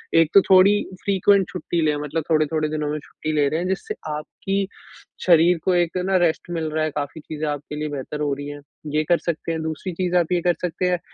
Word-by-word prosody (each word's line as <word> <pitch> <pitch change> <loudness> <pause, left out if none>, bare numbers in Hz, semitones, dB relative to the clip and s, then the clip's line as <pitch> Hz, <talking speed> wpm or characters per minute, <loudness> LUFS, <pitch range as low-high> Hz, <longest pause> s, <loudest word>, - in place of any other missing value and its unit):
एक 165 -2 +5
तो 200 - +8
थोड़ी 190 +2 +7 0.3
फ्रीक्वेंट 200 -1 +3
छुट्टी 170 +2 -2
लें 150 -1 +2
मतलब 150 +2 -2
थोड़े-थोड़े 155 -1 +1
दिनों 150 -1 -2
में 150 - -2
छुट्टी 155 +1 -6
ले 145 -1 +3
रहे 160 - -1
हैं, 180 - -2
जिससे 430 - -3 0.2
आपकी 195 +5 -3 0.6
शरीर 170 0 +5
को 185 - +3
एक 175 +1 +1
ना 190 0 +3
रेस्ट 165 +1 -1
मिल 160 -2 -2
रहा 155 0 0
है, 155 - -1
काफ़ी 145 +2 -4
चीज़े 155 0 -5
आपके 145 0 -4
लिए 150 0 -2
बेहतर 145 +1 -5
हो 145 -2 0
रही 145 +1 -6
हैं। 145 0 -8 0.3
ये 155 - +3
कर 175 - +5
सकते 165 -1 -3
हैं, 160 - -3
दूसरी 160 +3 -4
चीज़ 180 +1 -1
आप 170 -1 +1
ये 175 - +2
कर 175 +1 +3
सकते 180 +1 -1
हैं 180 -1 +1
160 Hz, 230 wpm, -22 LUFS, 150-180 Hz, 0.6 s, तो